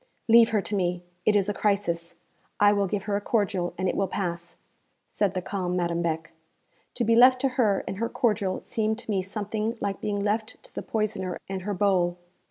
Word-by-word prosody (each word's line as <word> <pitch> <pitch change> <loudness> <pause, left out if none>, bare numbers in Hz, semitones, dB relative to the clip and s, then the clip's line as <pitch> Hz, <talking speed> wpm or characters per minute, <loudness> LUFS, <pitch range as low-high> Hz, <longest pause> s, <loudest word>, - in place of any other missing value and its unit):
'Leave 230 0 +7
her 215 -3 +1
to 210 - -2
me; 180 -2 -1 0.2
it 210 - +5
is 200 -1 +3
a 205 - 0
crisis. 175 -5 -1 0.4
I 205 0 +6
will 200 -1 +1
give 195 +1 -2
her 205 -1 -1
a 205 - -1
cordial, 200 -5 0
and 185 +1 0
it - - +1
will 195 - +1
pass,' 175 -2 -4 0.5
said 200 -3 0
the 185 - -2
calm 180 -2 -2
Madame 170 -1 0
Beck. 165 -1 -2 0.6
To 245 - 0
be 230 0 +3
left 255 +2 +7
to 270 - +2
her 225 -6 +1
and 190 - -4
her 230 +2 -1
cordial 210 -5 0
seemed 220 0 -1
to 230 - -6
me 195 -2 +1
something 215 +4 -3
like 200 -1 -3
being 205 -1 -1
left 215 +1 -1
to - - -12
the - - -4
poisoner 195 -5 -2
and 190 -1 -4
her 205 +2 -3
bowl. 180 -2 +2
200 Hz, 210 wpm, -26 LUFS, 185-215 Hz, 0.6 s, Leave